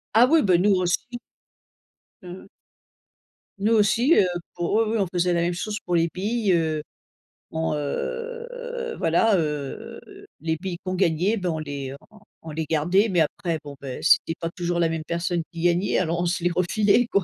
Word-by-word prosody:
Ah 240 Hz, +3 st, +7 dB
oui, 320 Hz, -4 st, +5 dB
bah, 185 Hz, -3 st, +4 dB
nous 195 Hz, +2 st, +4 dB
aussi. 185 Hz, +7 st, -1 dB, 1.0 s
Ouais, 180 Hz, -, -10 dB
ouais. 185 Hz, +2 st, -10 dB, 1.1 s
Nous 215 Hz, +3 st, +1 dB
aussi, 230 Hz, +8 st, +4 dB
heu, 190 Hz, -, +5 dB, 0.3 s
pour 175 Hz, +2 st, -2 dB
oui, 225 Hz, +1 st, +4 dB
oui -, -, +1 dB
on 195 Hz, -, +2 dB
faisait 180 Hz, 0 st, +2 dB
la 170 Hz, -, +1 dB
même 175 Hz, +1 st, 0 dB
chose 210 Hz, +4 st, -3 dB
pour 175 Hz, -, 0 dB
les 165 Hz, 0 st, +3 dB
billes, 205 Hz, +1 st, 0 dB
heu, 160 Hz, -2 st, +1 dB, 0.7 s
on, 160 Hz, -1 st, -1 dB
heu 475 Hz, -, -4 dB
voilà, 185 Hz, +5 st, +3 dB
heu, 150 Hz, -3 st, -4 dB, 0.4 s
les 160 Hz, +1 st, -1 dB
billes 180 Hz, 0 st, -5 dB
qu'on 185 Hz, -, -2 dB
gagnait, 185 Hz, +3 st, +2 dB
bah 180 Hz, -2 st, -2 dB
on 160 Hz, -, -3 dB
les 140 Hz, -3 st, -5 dB, 0.2 s
on 215 Hz, -, -17 dB, 0.2 s
on 160 Hz, -, -7 dB
les 160 Hz, +1 st, -3 dB
gardait 175 Hz, +8 st, +2 dB
mais 175 Hz, -3 st, +2 dB
après 170 Hz, +1 st, -1 dB
bon, 145 Hz, -1 st, -9 dB
beh, 130 Hz, -2 st, -6 dB
c'était 165 Hz, 0 st, +4 dB
pas 165 Hz, -, -2 dB
toujours 175 Hz, -1 st, -1 dB
la 165 Hz, -, +3 dB
même 165 Hz, -1 st, -2 dB
personne 170 Hz, 0 st, -1 dB
qui 170 Hz, -1 st, -7 dB
gagnait. 175 Hz, +3 st, +2 dB
Alors 170 Hz, -1 st, 0 dB
on -, -, 0 dB
se 175 Hz, 0 st, -1 dB
les 175 Hz, -, +2 dB
refilait 205 Hz, +6 st, +2 dB
quoi. 200 Hz, -5 st, +1 dB
175 Hz, 190 wpm, -24 LUFS, 165-210 Hz, 1.1 s, Ah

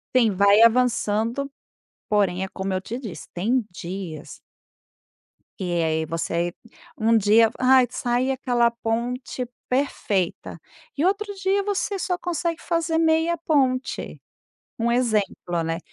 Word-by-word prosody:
Sim, 235 Hz, -4 st, +5 dB
vai 200 Hz, +2 st, +5 dB
avançando, 230 Hz, +2 st, +2 dB, 0.6 s
porém, 195 Hz, -3 st, +1 dB
é 190 Hz, -, -2 dB
como 190 Hz, 0 st, -4 dB
eu 185 Hz, -, 0 dB
te 230 Hz, +5 st, -6 dB
disse, 220 Hz, -9 st, -8 dB
tem 225 Hz, +6 st, 0 dB
dias 170 Hz, -4 st, -7 dB, 1.2 s
e 175 Hz, -2 st, 0 dB
aí 160 Hz, 0 st, 0 dB
você 170 Hz, +1 st, -2 dB, 0.4 s
um 225 Hz, +1 st, +3 dB
dia 220 Hz, +2 st, +5 dB
aí, 255 Hz, -1 st, +5 dB
sai 245 Hz, +2 st, 0 dB
aquela 245 Hz, -3 st, +1 dB
ponte 240 Hz, +2 st, -3 dB, 0.2 s
perfeita 215 Hz, -9 st, -1 dB, 0.4 s
e 300 Hz, -, +1 dB
outro 405 Hz, +2 st, 0 dB
dia 390 Hz, +1 st, +1 dB
você 405 Hz, 0 st, -1 dB
só 360 Hz, 0 st, -1 dB
consegue 340 Hz, -1 st, -2 dB
fazer 335 Hz, -1 st, 0 dB
meia 325 Hz, +1 st, +2 dB
ponte. 270 Hz, -5 st, -1 dB, 0.6 s
Um 235 Hz, +1 st, +1 dB
exemplo, 210 Hz, -8 st, 0 dB
né, 165 Hz, 0 st, -2 dB
235 Hz, 125 wpm, -24 LUFS, 195-275 Hz, 1.2 s, Sim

